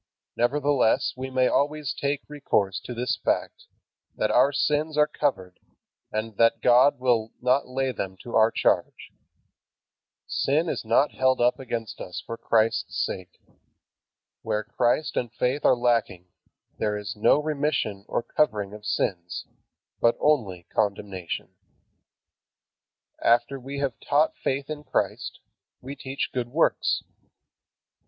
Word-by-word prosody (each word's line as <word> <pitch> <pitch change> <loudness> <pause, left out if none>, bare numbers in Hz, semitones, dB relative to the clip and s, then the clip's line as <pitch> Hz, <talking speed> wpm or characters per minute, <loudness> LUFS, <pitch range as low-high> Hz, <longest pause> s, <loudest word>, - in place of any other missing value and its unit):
Nevertheless 135 -1 +2
we 130 +1 -5
may 130 -1 +2
always 150 -1 0
take 140 0 -2
recourse 105 -10 0
to 125 - -6
this 125 +2 -1
fact, - - -1 0.5
"that 110 - 0
our 130 +5 +5
sins 150 +2 0
are 150 - +6
covered," 130 -12 -2 0.5
and 110 -1 -4
that 115 0 +4
"God 125 +3 +5
will 120 -3 +1
not 125 +2 +2
lay 130 +1 -1
them 95 -5 -5
to 120 - -6
our 110 0 +6
charge." - - 0 1.1
Sin 155 +5 +1
is - - -3
not 115 +6 +3
held 130 0 +2
against 120 -2 -1
us 90 - -6
for 115 - -5
Christ's 115 0 +1
sake. 95 -2 -7 1.0
Where 105 0 -1
Christ 120 +6 0
and 120 -3 -1
faith 125 +4 -1
are 125 - +5
lacking, 115 -7 0 0.5
there 105 -1 0
is 105 0 -5
no 105 +7 +4
remission 145 -9 -1
or - - -1
covering 105 -6 0
of 105 0 -9
sins, 85 -2 -2 0.5
but 115 0 +3
only 105 - +1
condemnation. 100 -4 -2 1.7
After 120 +4 +3
we 135 +2 -7
have 140 -4 -2
taught 150 +2 +2
faith 135 +1 -1
in 150 -1 -6
Christ, - - -2 0.4
we 135 +3 -8
teach 135 0 -4
good 125 -2 -2
works. 160 +6 +1
125 Hz, 130 wpm, -26 LUFS, 110-140 Hz, 1.7 s, are